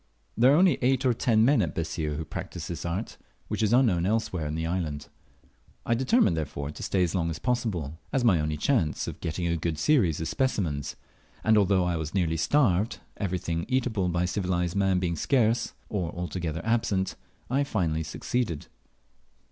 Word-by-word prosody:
There 125 +4 +5
are - - +6
only 180 0 +4
eight 130 +1 +2
or 125 - +4
ten 110 -1 +3
men 135 -2 +4
at 85 -6 -2
Bessir 80 -2 -2
who 80 - -4
practise 80 +2 -6
this 85 0 -5
art, 95 +7 -4 0.3
which - - -2
is 110 -1 +2
unknown 110 -9 +3
anywhere - - +2 0.3
else - - -3
in 75 - -3
the 80 0 -2
island. 80 -4 -3 0.8
I - - +2
determined, 130 - +3
therefore, 75 -2 -4
to - - -10
stay 95 -2 +1
as 85 - -1
long 85 -3 0
as 80 - -3
possible, 90 - -2
as 135 - +1
my 95 -8 +5
only 75 0 -1
chance 80 - +1
of - - -6
getting 85 +1 -2
a 85 0 +1
good 80 0 -2
series 90 - +3
of 80 - -2
specimens; 85 - -1 0.5
and 110 0 +4
although 100 -3 +4
I 90 -1 0
was 80 +2 -5
nearly 85 -4 +1
starved, 105 - +2 0.2
everything 85 -4 -2
eatable 120 -8 0
by 85 +1 0
civilized 90 -1 -1
man 95 -2 +2
being 90 -2 0
scarce 115 - +1
or 90 -6 -2
altogether 85 -2 -3
absent, 110 -4 +1 0.3
I 135 +3 +1
finally 85 - -1
succeeded. 85 +2 -2
90 Hz, 185 wpm, -27 LUFS, 80-115 Hz, 0.8 s, are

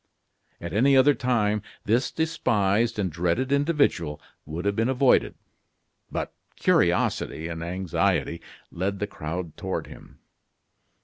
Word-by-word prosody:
At 85 -1 -6
any 135 +6 +4
other 140 +2 +6
time 105 -5 +1 0.2
this 120 +5 +2
despised 115 -9 +1
and 95 -4 -1
dreaded 90 - 0
individual 140 - +1 0.3
would 80 +5 -5
have 100 0 +1
been 115 +3 +1
avoided; 130 0 +3 0.8
but - - -3 0.2
curiosity 80 - +1
and 85 -1 -5
anxiety 90 +1 -1 0.3
led 95 +3 -2
the 105 - -1
crowd 85 -4 -5
toward - - -3
him. - - -14
105 Hz, 120 wpm, -25 LUFS, 85-130 Hz, 0.8 s, other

